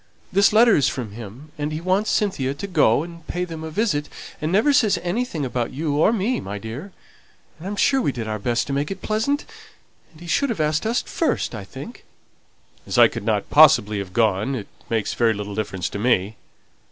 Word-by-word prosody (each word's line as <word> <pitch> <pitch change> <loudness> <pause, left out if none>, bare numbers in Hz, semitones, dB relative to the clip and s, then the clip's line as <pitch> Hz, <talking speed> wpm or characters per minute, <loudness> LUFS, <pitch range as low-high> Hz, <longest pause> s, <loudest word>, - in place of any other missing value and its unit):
This 200 +2 +5
letter 225 +1 +6
is 140 - +3
from 120 -6 -5
him; 120 +7 -10
and 145 +1 -2
he 155 - -3
wants 185 +5 0
Cynthia 140 -10 0
to 170 - -6
go 150 - +3
and 170 -1 -11
pay 180 0 -2
them 165 -2 -7
a 160 - -5
visit, 155 -5 -1 0.3
and 155 +2 -1
never 220 +10 +3
says 215 -7 +3
anything 175 - -2
about 125 -2 -2
you 145 +1 -2
or 160 - +4
me, 230 +3 0
my 100 +1 -6
dear. 115 - -7 0.7
And 175 - -7
I'm 205 - -3
sure 270 +6 +3
we 145 - +1
did 115 -4 -5
our 110 0 -3
best 120 +3 0
to 140 - -4
make 140 +1 -1
it 195 - -7
pleasant; 225 +7 0 0.7
and 155 - -18
he 175 - -11
should 265 - +1
have 225 - -3
asked 155 +6 0
us 235 +2 0
first, 325 - -1
I 110 -3 -6
think." 95 - -10 0.8
"As - - -2
I - - +8
couldn't 105 -1 -2
possibly 110 -9 +6
have 95 -2 -6
gone, 110 +4 +1
it 110 -5 -6 0.2
makes 110 -3 -1
very 115 -2 +2
little 105 0 -5
difference 95 -4 -3
to 100 - -5
me." 105 -2 +1
150 Hz, 210 wpm, -22 LUFS, -, 0.8 s, I